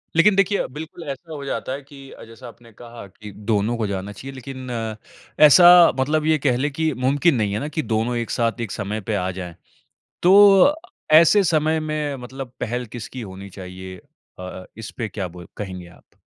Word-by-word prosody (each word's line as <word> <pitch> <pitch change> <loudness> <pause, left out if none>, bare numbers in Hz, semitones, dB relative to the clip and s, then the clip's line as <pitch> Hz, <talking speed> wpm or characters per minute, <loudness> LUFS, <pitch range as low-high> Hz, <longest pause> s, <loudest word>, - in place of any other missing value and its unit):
लेकिन 195 +4 +5
देखिए 195 +1 +2
अ, - - -2
बिल्कुल 160 +4 -9
ऐसा 155 +4 -7
हो 145 -2 -7
जाता 130 - -4
है 140 - -6
कि 140 +1 -16 0.3
जैसा 115 +2 -12
आपने 115 0 -15
कहा 115 -1 -11
की 105 +2 -12 0.2
दोनों 110 +3 0
को 110 -3 -1
जाना 100 +1 -4
चाहिए। 135 +7 -9
लेकिन 130 0 -9 0.8
ऐसा 175 +3 +8
मतलब 150 +3 0
ये 155 0 +3
कह 125 -2 +2
ले 145 +3 0
की 160 +2 -1
मुमकिन 145 +4 +3
नहीं 105 -4 -1
है 105 - -1
ना 145 - -4
की - - +2
दोनों 115 +3 0
एक 115 - -3
साथ 115 0 -1
एक 115 - -4
समय 105 +1 -4
पे 105 - +1
आ 90 -1 -1
जाएँ। 90 -2 -7 0.7
तो 200 +7 +7 0.4
ऐसे 170 +6 +6
समय 155 -1 +1
में 155 -2 -3
मतलब 130 0 -8
पहल 125 +1 -3
किसकी 120 +2 -7
होनी 100 -1 -9
चाहिए? 95 0 -9 0.4
अ, 90 0 -8
इसपे 110 +1 -6
क्या 95 -3 -5
बोल 90 0 -12
कहेंगे 95 -3 -7
आप? 90 - -22
125 Hz, 190 wpm, -21 LUFS, 105-155 Hz, 0.8 s, ऐसा